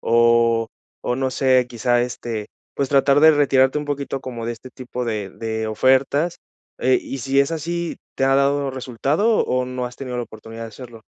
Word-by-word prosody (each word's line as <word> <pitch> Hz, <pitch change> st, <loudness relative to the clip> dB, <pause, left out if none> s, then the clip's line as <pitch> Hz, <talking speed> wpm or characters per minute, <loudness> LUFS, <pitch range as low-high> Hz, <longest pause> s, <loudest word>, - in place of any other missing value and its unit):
o 115 Hz, -1 st, +3 dB, 0.4 s
o, 125 Hz, -, 0 dB
no 130 Hz, -1 st, -1 dB
sé, 130 Hz, -1 st, +3 dB
quizá, 120 Hz, +1 st, +1 dB
este, 120 Hz, -3 st, -4 dB, 0.3 s
pues, 140 Hz, -, -1 dB
tratar 140 Hz, +1 st, +4 dB
de 160 Hz, +1 st, +8 dB
retirarte 140 Hz, -1 st, +3 dB
un 150 Hz, -, -4 dB
poquito 140 Hz, -1 st, -3 dB
como 120 Hz, -3 st, -6 dB
de 120 Hz, -, -2 dB
este 125 Hz, +3 st, -11 dB
tipo 125 Hz, -1 st, -6 dB
de 105 Hz, -4 st, -3 dB
de 110 Hz, 0 st, -3 dB
ofertas? 135 Hz, +8 st, +2 dB, 0.4 s
Eh, 130 Hz, 0 st, +3 dB
y 135 Hz, -, -6 dB
si 135 Hz, +3 st, 0 dB
es 140 Hz, +3 st, +3 dB
así, 170 Hz, +1 st, -3 dB, 0.2 s
¿te 135 Hz, -, +1 dB
ha 135 Hz, 0 st, +3 dB
dado 140 Hz, 0 st, +2 dB
resultado, 140 Hz, -, +1 dB
o 125 Hz, 0 st, 0 dB
no 125 Hz, -1 st, -3 dB
has 125 Hz, -, -9 dB
tenido 125 Hz, -2 st, -6 dB
la 120 Hz, -, -2 dB
oportunidad 115 Hz, +1 st, -10 dB
de 115 Hz, -, -6 dB
hacerlo? 115 Hz, 0 st, -12 dB
130 Hz, 195 wpm, -21 LUFS, 115-140 Hz, 0.4 s, de